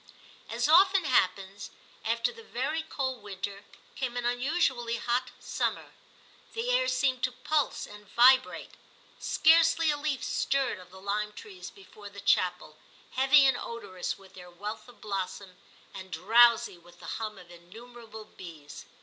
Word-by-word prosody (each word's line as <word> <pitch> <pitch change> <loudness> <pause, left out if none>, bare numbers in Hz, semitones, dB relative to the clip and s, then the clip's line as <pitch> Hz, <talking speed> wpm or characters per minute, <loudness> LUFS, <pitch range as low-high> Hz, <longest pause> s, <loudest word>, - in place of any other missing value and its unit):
As 240 +4 0
often 375 +2 +5
happens, 195 -6 0 0.3
after 230 - 0
the 460 - -13
very 325 -7 -3
cold 265 -6 -4
winter 200 0 -7 0.3
came 245 -2 -4
an 245 - -2
unusually 245 -2 0
hot 245 +2 -1
summer. - - -3 0.6
The 460 +2 -2
air - - +2
seemed 260 - +1
to 255 - 0
pulse 295 +4 -1
and 210 -1 -14
vibrate. 255 +2 +4 0.5
Scarcely 325 0 +4
a 295 - -2
leaf 290 -2 -2
stirred 275 -7 0
of 180 - -14
the 190 +1 -13
lime 210 +2 -2
trees 380 - -10
before 215 - -13
the 200 0 -11
chapel, 180 -5 0 0.3
heavy 270 +2 +5
and 265 -2 +4
odorous 200 -7 -5
with 195 -1 -18
their 180 -1 -12
wealth 210 +5 -7
of 240 - -18
blossom, 190 -2 -5 0.4
and 190 -1 -9
drowsy 225 +3 +4
with 175 +1 -19
the - - -12 0.2
hum 215 -2 -4
of 175 -2 -14
innumerable 220 +5 -12
bees. 160 -8 -11
230 Hz, 150 wpm, -29 LUFS, 195-270 Hz, 0.6 s, often